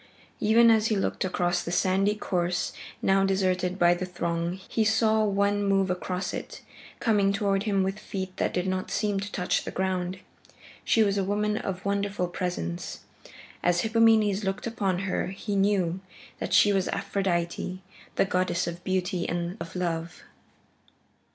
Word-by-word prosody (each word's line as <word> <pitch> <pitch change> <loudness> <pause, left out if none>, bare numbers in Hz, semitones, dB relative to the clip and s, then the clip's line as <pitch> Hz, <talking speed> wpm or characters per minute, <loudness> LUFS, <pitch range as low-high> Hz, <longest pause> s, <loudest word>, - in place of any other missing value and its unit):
Even 230 +2 +6
as 220 -1 +3
he 220 - +1
looked 195 - -1
across 175 -1 0
the 170 - -5
sandy 195 +3 +2
course 180 -4 -1 0.3
now 195 0 +4
deserted 185 -1 +1
by 175 -1 +5
the 175 - -4
throng, 170 0 -2
he 225 - +1
saw 220 0 +3
one 200 0 +1
move 195 -2 +2
across 180 +1 -3
it, - - -6 0.4
coming 205 -4 +3
toward 200 0 0
him 200 -3 +2
with 195 +2 -2
feet 190 -3 -5
that - - 0
did 180 0 -1
not 185 0 -2
seem 205 -2 0
to 205 +1 -5
touch 180 -1 0
the - - -5
ground. 185 -1 -2 0.7
She 225 - +4
was 200 -1 +1
a - - +1
woman 210 +2 0
of 190 -2 -4
wonderful 200 -2 -1
presence. 175 - -4 0.6
As 175 0 +2
Hippomenes 220 -2 +3
looked 195 +1 -2
upon 200 -5 -1
her 190 - -1
he 200 +2 -4
knew 195 -3 +2 0.4
that - - -4
she 205 - +5
was 190 -1 +1
Aphrodite, 185 -1 -2 0.3
the - - +3
goddess 185 -2 0
of 170 +1 -6
beauty 185 -1 -1
and 175 +1 -2
of 165 +1 -7
love. 170 -2 -3
190 Hz, 160 wpm, -27 LUFS, 180-205 Hz, 0.7 s, Even